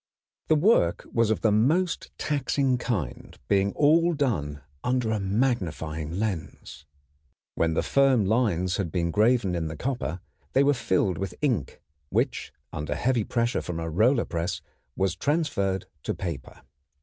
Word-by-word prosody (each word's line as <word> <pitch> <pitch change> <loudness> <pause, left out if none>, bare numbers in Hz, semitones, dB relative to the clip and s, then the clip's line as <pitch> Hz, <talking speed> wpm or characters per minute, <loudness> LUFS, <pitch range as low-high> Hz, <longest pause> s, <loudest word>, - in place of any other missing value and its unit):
The 155 - +4
work 155 - +3
was 115 -2 +3
of 110 - 0
the 110 - +3
most 155 - +1
taxing 135 -3 0
kind, 90 - -4
being 100 0 +2
all 165 +4 +4
done 75 - -1 0.2
under 125 -3 0
a 110 - 0
magnifying 90 - -1
lens. 85 -7 -4 0.7
When 80 -1 0
the - - +1
firm 135 -6 +3
lines 95 -5 +1
had 95 -6 -2
been 85 -1 0
graven 110 -1 +3
in 85 -2 -1
the 80 0 -6
copper 120 - -3 0.3
they 135 - +5
were 145 +1 +4
filled 95 - 0
with 95 -2 -4
ink, 120 - -1 0.3
which - - -1 0.2
under 75 0 -3
heavy 120 +6 +1
pressure 120 +3 0
from 85 -2 -4
a 80 0 -4
roller 115 - +3
press 85 0 -2 0.4
was 95 -1 0
transferred 130 - 0 0.2
to - - -3
paper. 80 -8 -6
105 Hz, 150 wpm, -26 LUFS, 85-130 Hz, 0.7 s, they